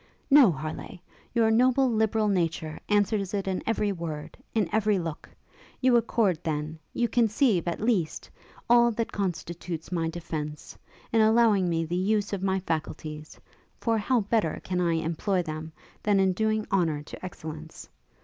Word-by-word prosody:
'No, 275 -8 +8
Harleigh! 155 +4 -6 0.4
your 225 -1 +4
noble, 255 +3 +4
liberal 220 -2 +1
nature 165 -5 -1
answers 205 -1 +1
it 195 -1 -2
in 190 -1 -1
every 210 -2 +1
word, 165 -5 -6 0.2
in 215 -5 +2
every 215 -2 +2
look! 165 -3 -5 0.5
You 255 -2 +4
accord, 225 -7 +2
then, 155 0 -3
you 240 - 0
conceive, 225 - +2
at 170 - -2
least, 205 -8 0 0.4
all 235 0 +6
that 230 +1 -2
constitutes 175 -3 -4
my 165 -2 0
defence, 155 -3 -6 0.4
in 225 - +5
allowing 220 -4 +4
me 165 -1 0
the 170 +2 -3
use 205 +3 0
of 195 - -2
my 190 0 +1
faculties; 155 -2 -5 0.4
for 225 -1 +1
how 240 +3 +2
better 205 -5 0
can 180 -1 -1
I 170 -1 +2
employ 165 +3 0
them 155 0 -6 0.3
than 205 -2 +2
in 190 -1 +3
doing 215 +2 0
honour 165 -6 +1
to - - -11
excellence? 160 -3 -8
190 Hz, 155 wpm, -27 LUFS, 165-220 Hz, 0.5 s, No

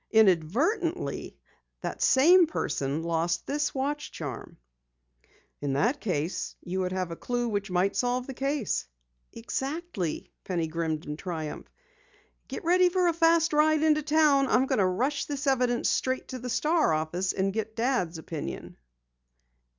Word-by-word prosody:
Inadvertently, 225 - +1 0.4
that - - -5
same 340 +6 +6
person 145 - -2
lost 170 +1 -1
this 295 +1 -1
watch 290 +2 -2
charm." 140 -7 -7 1.0
"In 140 -2 -1
that 235 - +1
case, 175 -4 -2
you 185 +1 -3
would 185 -1 -1
have 185 -2 -2
a - - -4
clue 245 +5 -2
which 205 -2 -2
might 185 +2 +1
solve 245 +4 0
the 270 - -6
case." 275 - -1 0.4
"Exactly," 270 - -4
Penny 175 -3 -1
grinned 160 -1 -3
in 150 0 -5
triumph. 160 -4 -5 0.8
"Get - - -6
ready 360 +2 +4
for 360 -1 +2
a - - +1
fast 330 -1 +3
ride 310 +1 +4
into 305 -1 +4
town. 295 -2 +3
I'm 260 - +3
going 265 - 0
to 190 - +4
rush 260 +10 0
this 285 0 -4
evidence 250 -3 +2
straight 260 0 -1
to 255 - -5
the 250 +1 -6
Star 305 - +2
office 165 +4 -1
and 195 0 -1
get 220 0 -3
Dad's 230 -9 0
opinion." 155 - -6
240 Hz, 150 wpm, -28 LUFS, -, 1.0 s, same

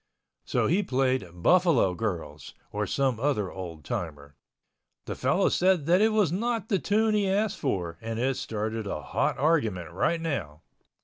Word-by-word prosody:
So - - +1
he 185 +5 +2
played 130 - 0
"Buffalo 130 - +3
Girls," 95 -3 -5 0.2
or 105 0 -2
some 130 +1 0
other 115 -8 0
old 85 -5 -8
timer. 75 -4 -5 0.7
The - - -4
fellow - - +1
said 180 -4 +2
that 180 +4 +4
it 220 - +5
was 210 -7 +2
not 225 +4 -1
the 195 - +2
tune 215 +3 +2
he 205 -2 +2
asked 205 +2 0
for 85 -3 -2
and 115 0 -4
it 130 +3 0
started 110 0 -3
a 75 -6 -4
hot - - 0
argument 115 - +1
right 135 - 0
now. 95 - -4
130 Hz, 165 wpm, -27 LUFS, -, 0.7 s, it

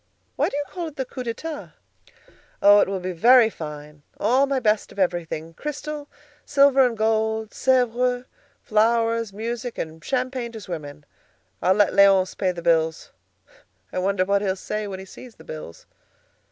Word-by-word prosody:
Why - - +1
do 280 - -4
you 290 - -1
call 350 -2 -5
it 310 - -10
the 265 - -3
'coup 255 0 -7
d'état?' 290 +6 -6 0.9
Oh! 205 +1 +7
it - - +3
will 195 -1 -2
be 185 0 -4
very 230 +6 +5
fine; 150 -2 -9 0.2
all 255 +6 +3
my 275 -1 0
best 215 -3 +1
of - - -15
everything—crystal, 190 - -3 0.4
silver 275 -1 +5
and 240 -3 0
gold, 220 0 0
Sèvres, 250 -1 +1 0.4
flowers, 230 0 +1
music, 235 +4 -5
and 160 0 -6
champagne 255 -1 -2
to 220 - -7
swim 170 -5 -6
in. 145 +1 -12 0.6
I'll 185 +2 +3
let 205 -2 +3
Léonce 195 -1 +5
pay 185 -2 0
the 170 -1 -8
bills. 160 -1 +1 0.8
I - - -1
wonder 185 0 +1
what 200 +1 +2
he'll 190 -2 0
say 210 +2 -4
when 195 -2 -5
he 190 - -9
sees 235 +4 -13
the - - -16
bills." 150 - -9
215 Hz, 165 wpm, -23 LUFS, 185-250 Hz, 0.9 s, Oh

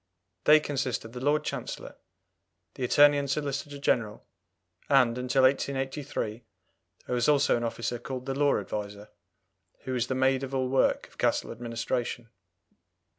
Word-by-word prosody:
They 155 +1 +8
consist 135 -6 -2
of 115 - -10
the 125 - -7
Lord 145 +3 +1
Chancellor, - - -5 0.8
the 130 - -6
Attorney 145 +3 +5
and 140 -1 -3
Solicitor 145 0 -3
General, 115 -6 -1 0.6
and, 125 -4 +4
until 125 +1 +1
1883, 135 -3 -1 0.6
there - - -4
was 120 +2 +2
also 145 -1 +4
an 120 - -2
officer 115 +1 -3
called 130 +1 -6
the 135 - -2
Law 145 +1 +2
Adviser, 105 0 -6 0.7
who 130 - -4
was 125 -1 0
the 130 - -2
maid 130 0 +2
of 135 0 -4
all 130 -1 0
work 135 0 +2
of - - -24
Castle - - +1
administration. 115 0 -4
130 Hz, 150 wpm, -28 LUFS, 120-140 Hz, 0.8 s, They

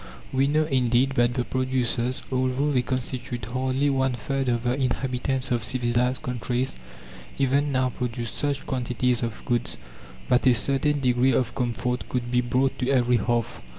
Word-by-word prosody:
We 135 +1 +3
know, 155 +2 +3
indeed, 130 -2 +2
that 120 -2 +2
the 125 - +1
producers, 130 0 -1
although 130 +3 +1
they 130 -3 +3
constitute 125 -1 -3
hardly 130 +4 0
one 130 -1 +1
third 135 +1 -2
of 120 -1 0
the 125 0 +1
inhabitants 130 0 -1
of 120 -2 +1
civilized 125 0 0
countries, 125 +1 -2 0.6
even 140 +2 +2
now 130 -1 +1
produce 120 -2 -4
such 140 -1 -2
quantities 125 -2 0
of 115 -2 -4
goods 120 -1 -1 0.5
that 125 +1 +3
a 125 - +6
certain 140 +4 +1
degree 125 0 +3
of 125 -3 +1
comfort 125 0 -2
could 120 -1 -2
be 125 0 +3
brought 130 +2 0
to 125 -1 0
every 125 -2 +3
hearth. 120 +1 -1
125 Hz, 160 wpm, -25 LUFS, 120-130 Hz, 0.6 s, a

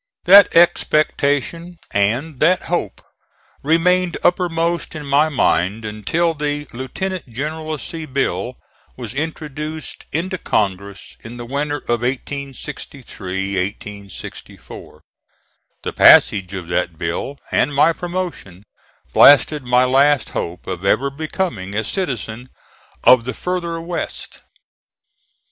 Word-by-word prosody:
That 200 0 +7
expectation 165 0 +2 0.2
and 125 +9 0
that 175 +4 +3
hope 165 - -3 0.6
remained 175 +3 +2
uppermost 170 -2 0
in 150 -1 -6
my 145 +3 +3
mind 110 - +1
until 110 - -1
the 145 -1 -3
Lieutenant 175 +9 -5
Generalcy 155 +4 -5
bill 125 -3 -1 0.4
was 120 -3 -6
introduced 155 +1 -5
into 180 +4 -2
Congress 100 -1 -2
in 115 +2 -10
the 120 - -7
winter 145 +3 -2
of 120 -1 0
1863 105 -7 -5 0.5
4. - - -13 0.8
The - - -4
passage 95 -1 +6
of 90 -3 -6
that 85 -1 -1
bill, 85 - -3
and 145 - +2
my 155 +4 +4
promotion, 175 - -5 0.5
blasted 145 +1 +6
my 125 0 +3
last 135 0 +3
hope 85 +1 -5
of 95 -1 -5
ever 135 +8 +2
becoming 140 - -4
a 110 - 0
citizen 125 - -4 0.5
of 125 -2 +6
the 130 - -4
further 170 -2 -3
West. 170 0 -6
140 Hz, 110 wpm, -19 LUFS, 110-165 Hz, 0.8 s, That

